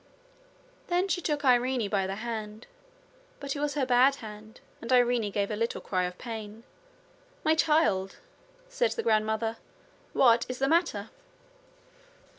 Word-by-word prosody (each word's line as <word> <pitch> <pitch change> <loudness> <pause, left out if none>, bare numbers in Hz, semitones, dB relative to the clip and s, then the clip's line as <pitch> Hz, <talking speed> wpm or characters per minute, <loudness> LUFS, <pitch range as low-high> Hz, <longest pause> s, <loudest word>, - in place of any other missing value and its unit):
Then 360 +2 +1
she 360 -2 -1
took 295 -3 -2
Irene 250 -2 +3
by 195 -2 0
the 195 - -3
hand, 220 -1 -6 0.7
but 280 0 -4
it - - -4
was 295 -1 -1
her 280 -3 +1
bad 255 +2 +4
hand 215 -2 -11 0.2
and 230 - -5
Irene 245 -4 +3
gave 200 +1 -1
a - - -1
little 230 +2 -2
cry 185 -2 -1
of 180 0 -6
pain. 220 -2 -7 0.8
'My 315 - +4
child!' 300 -13 +2 0.5
said - - 0
her 460 - -3
grandmother, 220 - 0 0.6
'what 235 -2 +4
is 255 - -4
the 270 - +1
matter?' 320 - +1
235 Hz, 145 wpm, -28 LUFS, 215-280 Hz, 0.8 s, bad